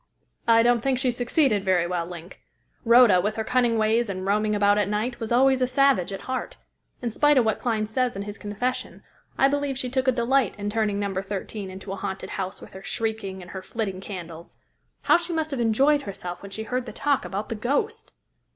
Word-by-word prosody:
"I 230 0 +6
don't 240 -1 +3
think 265 +1 +1
she 255 -1 +1
succeeded 245 -3 +1
very 185 -3 +2
well, 175 -1 -2
Link. 175 0 -10 0.4
Rhoda, 235 -6 +6
with 210 +3 -1
her 220 - -2
cunning 240 -1 +2
ways 220 +1 +2
and 185 -1 -4
roaming 210 +1 +1
about 205 0 +3
at 205 -1 0
night, 225 +4 -2
was 225 -1 -5
always 260 +2 +4
a 255 - +3
savage 260 -8 +3
at 195 - -5
heart. 260 0 -4 0.5
In 235 - -1
spite 295 +5 +4
of 245 - +4
what 220 - 0
Clyne 220 -3 0
says 245 +2 0
in 195 - -4
his 205 +1 -8
confession, 220 +5 -3 0.3
I 270 - +5
believe 285 -1 -1
she 250 -2 -3
took 260 0 0
a - - +6
delight 245 -1 +1
in 205 0 -3
turning 215 -2 0
No. 200 -1 -2
13 195 0 -5
into 190 +1 -8
a 195 - -4
haunted 190 0 -5
house 190 -1 -4
with - - -12
her 190 - -9
shrieking 200 -3 -3
and 175 - -12
her 190 - -6
flitting 195 -2 -4
candles. 170 -4 -9 0.5
How - - +5
she 345 0 -5
must 315 -1 -1
have 275 - -2
enjoyed 270 +6 +3
herself 180 -5 -7
when 200 - -9
she 220 +3 -5
heard 250 +2 -3
the - - -7
talk 285 -2 +1
about 200 +2 -4
the - - -2
ghost!" 405 - -2
220 Hz, 220 wpm, -25 LUFS, 195-255 Hz, 0.5 s, I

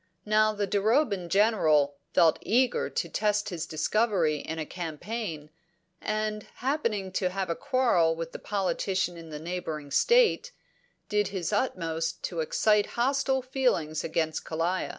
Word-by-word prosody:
Now 215 0 +4
the 205 -1 -1
Duroban 205 - +1
General 160 -9 +3 0.2
felt 165 -1 +4
eager 255 - +1
to - - -2
test 210 -1 0
his 165 -4 -4
discovery 170 -1 +1
in 160 +2 -5
a 160 - -3
campaign, 165 -1 -5 0.5
and, 215 0 -2
happening 230 -8 -1
to 185 0 0
have 190 -1 -2
a - - -1
quarrel 185 -12 +2
with 165 0 -6
a - - -6
politician 190 -2 -1
in 165 -1 -10
the 150 - -6
neighbouring 160 -3 -5
state, 485 - +3 0.5
did 210 0 +1
his 190 -2 -3
utmost 165 -7 -1
to 170 - -3
excite 210 +6 +2
hostile 265 +1 +1
feeling 250 - 0
against 160 -1 -1
Kalaya. 170 +3 -1
195 Hz, 140 wpm, -28 LUFS, 165-215 Hz, 0.5 s, Now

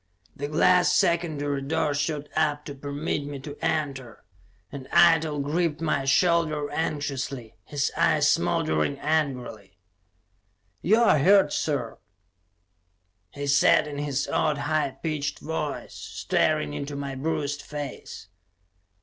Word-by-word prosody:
The 145 - -4
glass 180 +4 +4
secondary 155 -6 +1
door 145 +1 0
shot 145 +1 -2
up 150 -2 0
to 145 - -6
permit 145 +2 -3
me 145 0 -6
to 145 +1 -8
enter, 135 -6 -2 0.5
and 135 -2 -8
Eitel 160 -4 +4
gripped 155 +1 -1
my 155 -4 0
shoulder 155 -1 +2
anxiously, 140 -6 -3
his 145 -1 -1
eyes - - +3
smoldering 80 - +1
angrily. 135 -9 -2 1.0
"You're 220 -2 +4
hurt, 190 0 +5
sir!" 135 -7 -2 1.3
he 145 +6 -6
said 140 +2 +4
in 145 -1 -6
his 145 -1 -2
odd, 155 -2 +1
high 150 -2 -1
pitched 150 -3 -2
voice, 160 +1 -4
staring 75 -1 -1
into 140 - -5
my 140 -1 -4
bruised 145 0 -2
face. 145 -8 -7
145 Hz, 115 wpm, -26 LUFS, 140-155 Hz, 1.3 s, hurt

